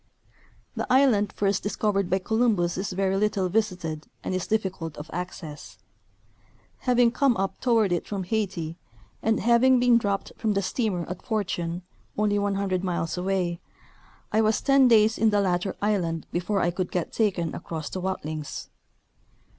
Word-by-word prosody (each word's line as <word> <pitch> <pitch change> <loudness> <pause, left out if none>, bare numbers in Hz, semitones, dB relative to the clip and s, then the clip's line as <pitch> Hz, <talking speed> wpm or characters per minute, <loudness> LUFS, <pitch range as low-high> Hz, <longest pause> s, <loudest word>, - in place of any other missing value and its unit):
The - - -3
island 250 -7 +4
first 200 -1 0
discovered 205 -2 0
by 190 - +3
Columbus 205 -4 +1
is 190 +2 -3
very 190 +1 0
little 200 -2 +1
visited 180 -7 -2 0.2
and - - -2
is 185 -1 -2
difficult 190 -7 -2
of 150 +2 -8
access. 170 -3 -7 1.1
Having 245 -1 +5
come 255 -2 +2
up 195 0 -2
toward 225 -6 +3
it 175 - -1
from 200 -2 -3
Haiti, 180 -5 -2 0.4
and 220 -1 +1
having 240 +3 +5
been 245 -1 +5
dropped 200 -3 -2
from 220 -2 0
the 200 0 0
steamer 190 -3 -1
at 180 +1 -6
Fortune, 180 -5 -2 0.3
only 205 -1 +2
100 195 -2 0
miles 170 -3 -1
away, 180 -2 -1 0.7
I 220 - +3
was 215 0 +2
ten 275 -2 +5
clays 220 -2 +4
in 225 - +4
the 205 -1 +2
latter 185 -1 0
island 175 -6 0
before 185 +3 0
I 175 - +2
could 180 0 -3
get 175 -2 -2
taken 185 -7 0
across 160 -3 -5
to 185 - -3
Watlings. 155 -5 -4
195 Hz, 155 wpm, -26 LUFS, 175-215 Hz, 1.1 s, Having